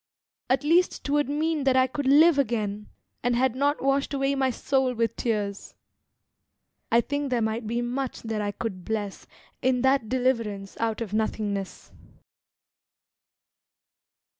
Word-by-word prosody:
At 260 +1 +2
least 340 +4 +2
'twould 290 -1 +1
mean 310 +1 0
that 265 -1 +4
I 260 - +5
could 260 +1 -3
live 300 +2 +6
again, 210 -5 -1 0.3
And 245 0 +1
had 255 0 +2
not 285 +2 0
washed 275 +1 +1
away 275 0 +1
my 270 -1 +1
soul 260 0 0
with 230 -1 0
tears. 205 -4 -3 1.2
I 235 +1 +5
think 285 +3 -3
there 250 -2 +1
might 220 0 -2
be 235 +2 -1
much 255 +2 -3
that 220 -2 -2
I 205 0 -1
could 195 -3 -5
bless 210 -2 -4 0.3
In 255 -1 +2
that 265 -4 +2
deliverance 230 -6 -1
out 225 0 -1
of 210 -3 -4
nothingness. 210 -3 -2
245 Hz, 140 wpm, -26 LUFS, 220-275 Hz, 1.2 s, live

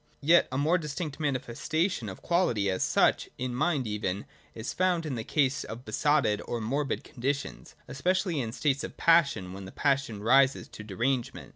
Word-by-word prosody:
Yet 170 +4 +5
a 130 - -2
more 160 +6 +2
distinct 150 -1 -5
manifestation 145 - -1
of 95 - -10
Quality 120 - +1
as 95 - -2
such, - - +2
in 125 0 -3
mind 145 0 0
even, 105 -2 -3 0.3
is 110 +2 -5
found 180 -2 +1
in 150 - -3
the 115 -3 -3
case 140 +1 +1
of 115 +3 -8
besotted 110 -2 +1
or 120 - -3
morbid 135 +6 -2
conditions, 140 +3 -4
especially 180 +3 0
in 115 -2 -3
states 140 +2 0
of - - -7
passion 155 - +4
and 90 - -9
when 95 0 -8
the 95 - -9
pas 140 -2 +1
sion 105 -3 -8
rises 135 +3 +4
to 110 - -10
derangement. 120 +5 -2
135 Hz, 180 wpm, -28 LUFS, 110-155 Hz, 0.3 s, Yet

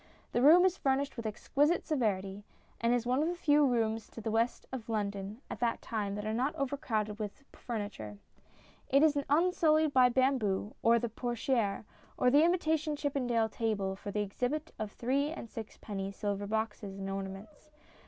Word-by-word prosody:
The 240 - +1
room 330 +7 +8
is 375 0 +2
furnished 275 +1 0
with 230 -3 -4
exquisite 290 +9 +1
severity, 205 - -1 0.4
and 235 0 +2
is 245 -1 +1
one 255 +3 +2
of 315 - +1
the 350 - -1
few 295 -4 +4
rooms 225 -3 0
in 225 - -6
the 220 - -1
West 230 +2 0
of 240 -3 -6
London 205 0 -3
at - - -7
the 235 -1 +1
time 205 -3 -3
that 210 0 -5
are 215 - -1
not 255 +6 0
overcrowded 225 -6 -2
with 210 +5 -6
furniture. 205 - -6 0.7
It 275 +3 +5
is 305 -2 +4
unsullied 315 -1 +3
by 255 -1 +6
bamboo, 240 -6 +1
or 230 +1 +5
the 235 +1 -1
"portiere," 235 -2 -1 0.3
or 250 - +3
the 290 +3 +6
imitation 320 -3 +1
Chippendale 250 -6 0
table 210 -4 -2
for 200 - -8
the 210 +1 -1
exhibit 250 +10 -3
of 215 -1 -3
three 275 +6 0
and 315 -7 -7
sixpenny 205 -3 -6
silver 205 0 -3
boxes 210 -2 -3
and 195 0 -5
ornaments. 195 +10 -7
235 Hz, 175 wpm, -32 LUFS, 210-280 Hz, 0.7 s, room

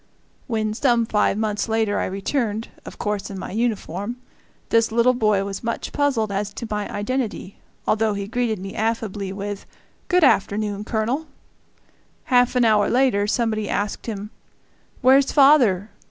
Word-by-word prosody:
When, 215 -3 -1
some 235 -1 +2
five 210 -2 +1
months 215 0 -1
later, 220 -2 +1
I - - -1
returned, 215 +3 -2 0.2
of - - -10
course 205 -1 -3
in 195 - -6
my - - -6
uniform, 215 -1 -2 0.5
this 230 0 +3
little 235 +2 +4
boy 215 -5 +2
was 195 0 -5
much 230 0 -3
puzzled 260 -8 +1
as 200 +1 -2
to 230 - -6
my 210 -1 -2
identity, 210 -3 -3 0.3
although 220 -1 +1
he 200 0 -3
greeted 230 0 -1
me 195 +1 -7
affably 215 -3 -2
with 200 +1 -6 0.4
"Good 360 -2 +3
afternoon, 205 -4 +2
Colonel." 235 +9 -1 1.0
Half 250 -1 +3
an 245 -1 +4
hour 210 -2 +3
later 240 -5 +2
somebody 215 -2 0
asked 205 +2 -2
him, 210 -1 -5 0.7
"Where's 265 +2 +5
father?" 245 -9 +5
215 Hz, 150 wpm, -22 LUFS, 205-240 Hz, 1.0 s, Where's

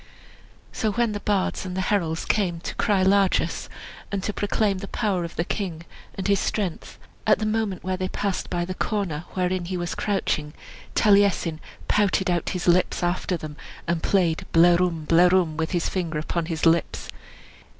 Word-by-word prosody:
So, 220 -3 -1
when 235 -1 +1
the 205 - -3
bards 200 -1 0
and 185 -1 -5
the - - +1
heralds 165 -5 0
came 180 -6 0
to - - -5
cry 200 -3 +2
largess, 195 0 +2 0.4
and 200 -2 -2
to 210 - -2
proclaim 205 -1 0
the 195 - -6
power 190 -3 -1
of 170 - -6
the 165 - 0
king, 170 -6 -4 0.3
and 190 - -3
his 200 -1 +3
strength, 195 -6 -3 0.3
at - - +6
the 215 - -2
moment 215 -3 -1
when 185 0 -1
they 185 0 -2
passed 200 0 -2
by 175 -1 -1
the 185 - -4
corner 180 -6 -2
wherein 180 -1 0
he 180 +1 -3
was 175 0 -3
crouching, 155 -7 -1 0.4
Taliesin 200 -6 +3 0.3
pouted 195 -3 +2
out 175 -2 0
his 180 -1 -3
lips 180 +1 +3
after 175 +1 0
them, 150 -2 -8 0.3
and 170 -1 0
played 175 -5 +1
"Blerwm, 170 -1 +4
blerwm!" 175 0 +4
with 160 +1 -1
his 175 -2 0
finger 170 -4 -2
upon 160 +2 -2
his 165 -1 -2
lips. 165 0 +2
180 Hz, 175 wpm, -24 LUFS, 170-200 Hz, 0.4 s, at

